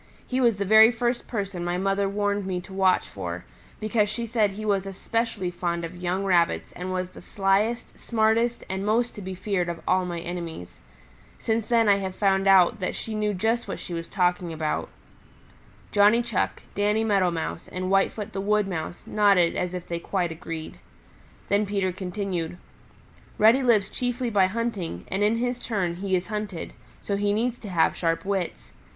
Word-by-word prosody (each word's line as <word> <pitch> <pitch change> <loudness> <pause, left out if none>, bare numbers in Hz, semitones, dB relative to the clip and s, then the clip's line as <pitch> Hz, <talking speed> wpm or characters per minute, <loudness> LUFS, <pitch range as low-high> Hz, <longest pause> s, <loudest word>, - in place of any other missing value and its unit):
"He 260 +1 -1
was 235 -5 +3
the 200 - -1
very 220 +3 +8
first 240 +1 -1
person 195 -6 -3
my 175 0 -1
mother 195 +1 +1
warned 205 -1 -1
me 185 -1 -1
to 190 - -12
watch 190 -1 +3
for, - - -6 0.3
because 215 -1 +1
she 230 +2 -3
said 220 -2 +2
he 215 +2 -6
was 195 -2 +1
especially 200 -1 -2
fond 170 -1 -2
of 165 +2 -8
young 180 +2 -2
Rabbits 175 -3 +2
and 180 +1 -5
was 185 0 -2
the - - -12
slyest, 205 +4 0
smartest 230 +1 +1
and 190 +1 -3
most 230 +4 +1
to 210 - -8
be 190 0 -5
feared 180 -2 -1
of 170 -1 -4
all 185 0 +3
my 170 -1 -3
enemies. 170 - -6 0.6
Since 225 -1 -1
then 230 -2 +3
I 200 -1 +5
have 190 -1 -4
found 195 -1 +2
out 195 +3 +6
that 185 - -2
she 225 - -5
knew 210 -1 0
just 225 +5 0
what - - -4
she 175 - -7
was 165 0 -4
talking 180 -2 0
about." 155 -1 -2 1.0
Johnny 210 +3 +5
Chuck, 235 -5 -2
Danny 210 +2 +1
Meadow 200 -4 +3
Mouse 165 0 -4
and 185 +1 -3
Whitefoot 195 +1 +1
the 195 - -2
Wood 210 0 +2
Mouse 175 -2 -5
nodded 200 -5 +3
as 180 0 -2
if 180 - -6
they 170 0 -3
quite 175 -1 -1
agreed. 160 -1 -7 0.7
Then 205 +1 +2
Peter 195 -2 0
continued, 180 -2 -3 0.8
"Reddy 225 +5 +6
lives 225 -6 +3
chiefly 245 +1 -2
by 195 -3 +4
hunting, 195 - -3
and 195 - -1
in 215 +2 +3
his 245 +1 -1
turn 180 -7 -1
he 190 0 0
is 180 0 -1
hunted, 210 -5 -5 0.3
so 200 - -1
he 205 0 +1
needs 240 +3 0
to 210 - -8
have 170 -3 +2
sharp 165 0 -1
wits. 185 - -3
195 Hz, 185 wpm, -26 LUFS, 180-215 Hz, 1.0 s, very